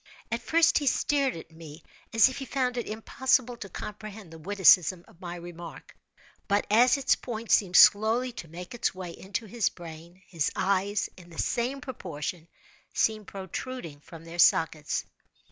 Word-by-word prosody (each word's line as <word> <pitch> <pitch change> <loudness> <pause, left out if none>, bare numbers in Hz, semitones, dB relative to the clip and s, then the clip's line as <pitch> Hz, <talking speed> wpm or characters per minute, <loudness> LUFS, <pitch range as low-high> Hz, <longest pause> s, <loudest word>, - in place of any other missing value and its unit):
At - - -1
first 330 0 +3
he 290 - -3
stared 275 0 +1
at 165 - -11
me 160 -1 -12 0.3
as 225 +1 +6
if 260 - -5
he 270 - -5
found 255 -2 -1
it 240 - -3
impossible 250 +3 0
to 200 - -8
comprehend 210 -1 -8
the 165 - -11
witticism 185 -1 +4
of 170 - -21
my 175 -1 -6
remark; 175 -1 -10 0.5
but 205 0 +1
as 245 +5 +5
its 275 - +3
point 230 -2 -6
seemed 180 -4 +3
slowly 225 +5 +6
to 205 -8 -9
make 175 +5 -9
its 235 -5 -1
way 185 -2 -6
into 190 +5 -5
his 225 0 0
brain, 170 +2 -12
his 165 -5 -1
eyes, 200 +2 0
in 175 -1 -14
the 165 - -13
same 255 +4 -1
proportion, 170 - -6 0.5
seemed 215 -2 +1
protruding 190 - -6
from 165 +2 -13
their 170 +1 -9
sockets. 160 -3 +3
195 Hz, 165 wpm, -28 LUFS, 170-240 Hz, 0.5 s, as